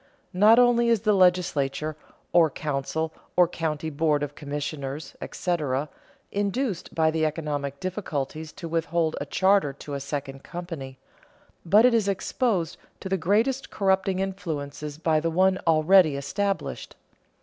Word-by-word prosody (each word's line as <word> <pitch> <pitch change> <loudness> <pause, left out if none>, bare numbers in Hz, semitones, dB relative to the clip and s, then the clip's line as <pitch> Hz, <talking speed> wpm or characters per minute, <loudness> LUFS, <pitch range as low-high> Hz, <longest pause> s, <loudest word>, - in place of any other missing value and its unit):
Not 210 +5 +6
only 240 -1 +4
is 230 -4 +3
the 215 -1 +3
legislature 160 -6 +2 0.4
(or 170 -2 +6
council, 155 +2 -3 0.2
or 180 -1 +5
county 160 -2 -3
board 150 0 +1
of 145 0 -4
commissioners, 145 0 -5
etc.) 150 -5 -2 0.4
induced 205 0 -2
by 160 -1 +3
the 160 0 -1
economic 145 -3 -2
difficulties 160 -5 -4
to 170 - -7
withhold 165 0 0
a - - -4
charter 190 -7 +3
to 145 +1 -9
a 140 - -2
second 140 -1 -5
company, 165 -7 -7 0.7
but 205 +7 +5
it 250 - +5
is 220 -3 +2
exposed 195 - -1 0.2
to 190 - -6
the 190 - +2
greatest 220 +10 +1
corrupting 190 -1 +1
influences 150 -6 -4
by 160 -1 +2
the 165 +2 -1
one 185 +3 +3
already 160 0 +5
established. 195 +8 -3
165 Hz, 140 wpm, -26 LUFS, 145-190 Hz, 0.7 s, Not